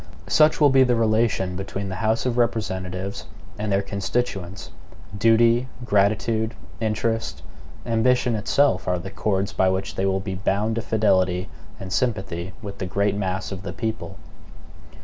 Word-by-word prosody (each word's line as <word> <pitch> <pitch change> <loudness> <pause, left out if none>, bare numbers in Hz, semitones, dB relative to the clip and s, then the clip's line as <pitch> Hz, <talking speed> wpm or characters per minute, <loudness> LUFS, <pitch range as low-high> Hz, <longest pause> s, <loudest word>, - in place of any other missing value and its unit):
Such 155 0 +4
will 145 -3 +6
be 135 0 +5
the 125 -1 +2
relation 110 -4 +1
between 95 +1 -4
the 95 - -4
House 110 +2 +1
of 125 -2 0
Representatives 95 -5 -2 0.3
and 105 -1 -2
their 100 0 +2
constituents. 100 -3 -3 0.4
Duty, 115 +3 +4 0.2
gratitude, 110 +2 +1 0.2
interest, 110 - -1 0.4
ambition 125 +1 +2
itself, 105 -1 +2
are 90 0 +1
the 95 +3 -7
chords 100 -1 -1
by 95 - +3
which 95 +1 -2
they 95 - 0
will 95 0 +1
be 95 0 -4
bound 100 +3 0
to - - 0
fidelity 95 -4 +1 0.3
and 95 -1 -5
sympathy 95 -7 -1
with 100 -1 -7
the 95 - -3
great 100 +2 +1
mass 95 -1 -2
of 95 -1 -5
the - - -6
people. 110 -1 -4
100 Hz, 150 wpm, -23 LUFS, 95-115 Hz, 0.4 s, will